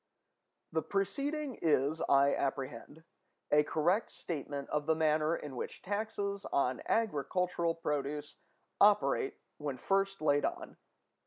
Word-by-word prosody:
The 160 Hz, -, +1 dB
preceding 275 Hz, -, -2 dB
is, 150 Hz, 0 st, +2 dB
I 140 Hz, 0 st, +5 dB
apprehend, 135 Hz, +2 st, -3 dB, 0.5 s
a 150 Hz, -, +6 dB
correct 175 Hz, +8 st, +1 dB
statement 145 Hz, -3 st, -5 dB
of 150 Hz, 0 st, -1 dB
the 160 Hz, -, +4 dB
manner 155 Hz, 0 st, +2 dB
in 145 Hz, -5 st, -7 dB
which -, -, -6 dB
taxes 200 Hz, 0 st, -2 dB
on 130 Hz, -2 st, +1 dB
agricultural 175 Hz, -3 st, 0 dB
produce 150 Hz, -2 st, -3 dB, 0.4 s
operate 150 Hz, -10 st, +4 dB, 0.2 s
when 145 Hz, -3 st, -3 dB
first 195 Hz, +6 st, 0 dB
laid 145 Hz, -2 st, +3 dB
on. -, -, -3 dB
155 Hz, 115 wpm, -33 LUFS, 145-195 Hz, 0.5 s, a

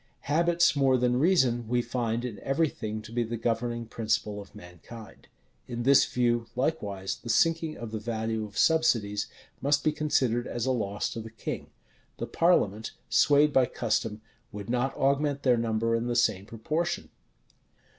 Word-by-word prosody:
Habits, 170 Hz, +2 st, +2 dB
more 135 Hz, -2 st, +3 dB
than 125 Hz, 0 st, +1 dB
reason, 130 Hz, -9 st, +2 dB
we 120 Hz, +1 st, +1 dB
find 120 Hz, -1 st, -2 dB
in 115 Hz, -4 st, -6 dB
every 145 Hz, +3 st, +1 dB
thing 110 Hz, -3 st, -5 dB
to 110 Hz, -, -11 dB
be 120 Hz, +1 st, 0 dB
the 115 Hz, 0 st, -3 dB
governing 120 Hz, +1 st, -2 dB
principle 105 Hz, -2 st, -2 dB
of 100 Hz, -, -15 dB
mankind. 100 Hz, +3 st, -12 dB, 0.4 s
In 120 Hz, -1 st, -4 dB
this 135 Hz, +2 st, +6 dB
view, 120 Hz, -2 st, +1 dB
likewise, 105 Hz, -9 st, -2 dB
the 120 Hz, -, -10 dB
sinking 165 Hz, +3 st, +2 dB
of 115 Hz, -2 st, -7 dB
the 110 Hz, -, -3 dB
value 110 Hz, 0 st, -2 dB
of 105 Hz, -1 st, -9 dB
subsidies 115 Hz, -11 st, +2 dB, 0.3 s
must 145 Hz, +1 st, +2 dB
be 155 Hz, -, +3 dB
considered 130 Hz, -6 st, 0 dB
as 120 Hz, 0 st, -3 dB
a 130 Hz, -, +1 dB
loss 105 Hz, -5 st, -1 dB
to -, -, -5 dB
the 115 Hz, -, -9 dB
king. 110 Hz, -, -6 dB, 0.5 s
The -, -, -3 dB
parliament, 110 Hz, -, +1 dB, 0.2 s
swayed 145 Hz, +5 st, +4 dB
by 130 Hz, -2 st, +4 dB
custom, 110 Hz, -2 st, -2 dB, 0.3 s
would 105 Hz, +1 st, -6 dB
not 125 Hz, +2 st, 0 dB
augment 140 Hz, +1 st, +1 dB
their 125 Hz, -2 st, +4 dB
number 115 Hz, 0 st, 0 dB
in 115 Hz, +1 st, -1 dB
the 120 Hz, -, -1 dB
same 105 Hz, -5 st, +1 dB
proportion. 155 Hz, +11 st, -2 dB
120 Hz, 165 wpm, -28 LUFS, 110-140 Hz, 0.5 s, this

